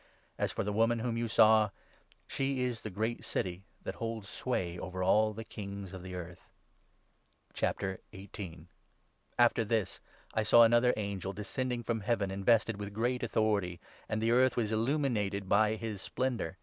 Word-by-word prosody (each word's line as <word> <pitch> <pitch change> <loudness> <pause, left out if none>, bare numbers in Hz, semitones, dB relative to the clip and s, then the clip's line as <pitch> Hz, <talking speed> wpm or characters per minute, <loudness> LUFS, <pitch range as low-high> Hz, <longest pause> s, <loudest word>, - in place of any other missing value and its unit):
As - - 0
for - - -2
the 105 - -2
woman 115 +2 +3
whom 120 +2 -2
18 - - -2
you 115 0 -1
saw, 110 -1 +5 0.6
she 135 -1 -1
is 125 -2 -2
the 110 - -5
great 110 +4 -2
city 95 +1 -3 0.2
that - - -4
holds 115 -3 -5
sway 90 -8 -2
over 95 0 -4
all 110 +3 +4
the 110 +1 -7
kings 100 -3 -7
of 95 - -7
the 90 0 -7
earth.' 90 -1 -9 1.1
After 95 -1 -1 1.6
this 110 -2 -1 0.3
I 110 - +1
saw 115 +2 +7
another 120 +2 +5
angel, 100 -2 -3
descending 120 +4 -3
from 115 -1 -1
Heaven, 100 -2 0
i - - -3
invested 110 +2 +2
with 100 -1 -6
great 125 +3 0
authority; 105 -6 0 0.3
and 110 - 0
the 115 +1 +1
earth 130 +2 +4
was 110 -3 0
illuminated 110 -5 0
by 110 +2 +4
his 110 -3 -5
splendour. 120 -10 -2
110 Hz, 160 wpm, -32 LUFS, 100-115 Hz, 1.6 s, saw